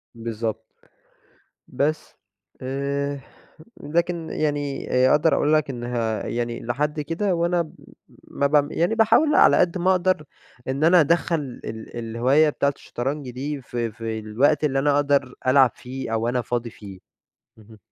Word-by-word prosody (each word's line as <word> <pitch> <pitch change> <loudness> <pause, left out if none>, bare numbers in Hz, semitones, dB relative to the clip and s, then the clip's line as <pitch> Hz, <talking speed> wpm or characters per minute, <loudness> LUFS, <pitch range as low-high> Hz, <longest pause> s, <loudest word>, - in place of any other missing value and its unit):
بالضبط. 115 -1 -4 1.1
بس. 155 +2 -2 0.5
آآ 140 +2 -2 0.6
لكن 170 +1 -1
يعني 145 -2 -2
آآ 130 +1 +4
أقدر 150 +2 +4
أقول 150 - +2
لك 155 -2 +2
إنها 120 -4 -3
يعني 120 0 -3
لحد 150 +5 -1
كده 170 +5 -1
وأنا 170 +1 +1
م 155 - -13 0.6
مبعم 145 +1 +2
يعني 175 +7 0
باحاول 265 +7 +4
على - - +6
قد 180 +1 +2
ما 180 +1 +2
أقدر 185 -3 +1 0.4
إن 135 +3 -1
أنا 175 +2 +6
أدخَّل 170 +2 +2 0.3
ال 110 +1 -8
الهواية 125 +7 +2
بتاعة 140 -1 0
الشطرنج 135 +2 -5
دي 140 +3 -5
ف 125 - -14
في 115 -1 -3
الوقت 120 +9 +1
اللي 135 -3 +1
أنا 145 +1 +2
أقدر 140 -3 +1
ألعب 130 -1 +5
فيه 130 -2 -6
أو 115 +1 0
أنا 125 +1 0
فاضي 120 0 -3
فيه. 100 -4 -12 0.6
اهم. 110 0 -16
140 Hz, 145 wpm, -23 LUFS, 120-155 Hz, 1.1 s, على